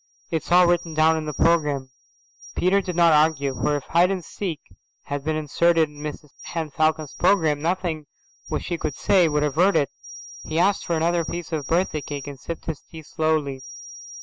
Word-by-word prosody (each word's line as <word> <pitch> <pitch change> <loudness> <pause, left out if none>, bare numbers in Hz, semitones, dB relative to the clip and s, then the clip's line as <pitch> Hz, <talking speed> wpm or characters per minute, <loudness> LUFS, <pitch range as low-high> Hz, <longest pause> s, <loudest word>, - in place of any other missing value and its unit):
It's 165 +1 -3
all 180 +1 +7
written 175 -2 0
down 160 +1 +4
in 160 -1 -3
the 150 - -3
programme." 150 -6 +1 0.6
Peter 195 +2 +2
did 180 -2 -5
not 170 -2 +5
argue, 150 -3 +2
for 145 +3 0
if 145 - -3
hide 175 +2 +3
and 185 -4 -3
seek 175 -7 -4 0.4
had 140 0 -4
been 155 +1 -1
inserted 160 +2 +2
in 150 - -16
Mrs 150 0 -7
Henne 160 -3 -4
Falcon's 155 -2 0
programme, 160 -6 +2
nothing 165 -3 -2 0.4
which - - -3
he 170 -2 -3
could 150 -4 -3
say 180 +3 +3
would 150 0 +1
avert 165 +7 +2
it. 140 - +2 0.5
He 155 - -4
asked 195 +4 +2
for 170 - +1
another 170 +1 +1
piece 170 0 -6
of 150 -4 -3
birthday 165 -2 0
cake 145 -1 -6
and 140 -2 -8
sipped 165 +4 -7
his 160 -3 -4
tea 160 -1 -12
slowly. 150 -3 -1
160 Hz, 190 wpm, -23 LUFS, 150-170 Hz, 0.6 s, all